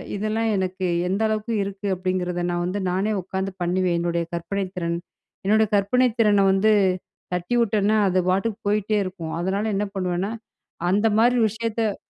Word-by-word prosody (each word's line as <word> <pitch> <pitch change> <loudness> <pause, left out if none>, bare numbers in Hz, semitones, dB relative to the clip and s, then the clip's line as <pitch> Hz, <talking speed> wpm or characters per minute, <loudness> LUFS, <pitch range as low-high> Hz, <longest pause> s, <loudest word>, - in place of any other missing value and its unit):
இதெல்லாம் 215 +2 -1
எனக்கு 185 0 -2 0.2
எந்த 195 +4 -1
அளவுக்கு 215 +1 -2
இருக்கு 200 +1 -5
அப்பிடிங்கிறத 180 -1 -2
நான் 175 0 -1
வந்து 190 +3 -2
நானே 200 +4 0
உட்காந்து 190 +1 -3
பண்ணுவேன். 180 0 +1
என்னுடைய 170 0 -1
கற்பனை 195 +3 -2
திறன் 170 -1 -1 0.5
என்னுடைய 215 +1 +4
கற்பனை 250 +6 +3
திறன 205 -3 +4
வந்து 205 +3 +3 0.6
தட்டிவிட்டன்னா, 215 +2 +1
அது 185 0 +2
வாட்டுக்கு 200 +3 0
போயிட்டே 210 +1 +1
இருக்கும். 180 -4 -6
அதனால 195 +4 -1
என்ன 205 +1 0
பண்ணுவன்னா, 185 +2 -1 0.6
அந்தமாரி 225 +4 +3
விஷயத்த 225 -1 -2
195 Hz, 140 wpm, -23 LUFS, 185-215 Hz, 0.6 s, என்னுடைய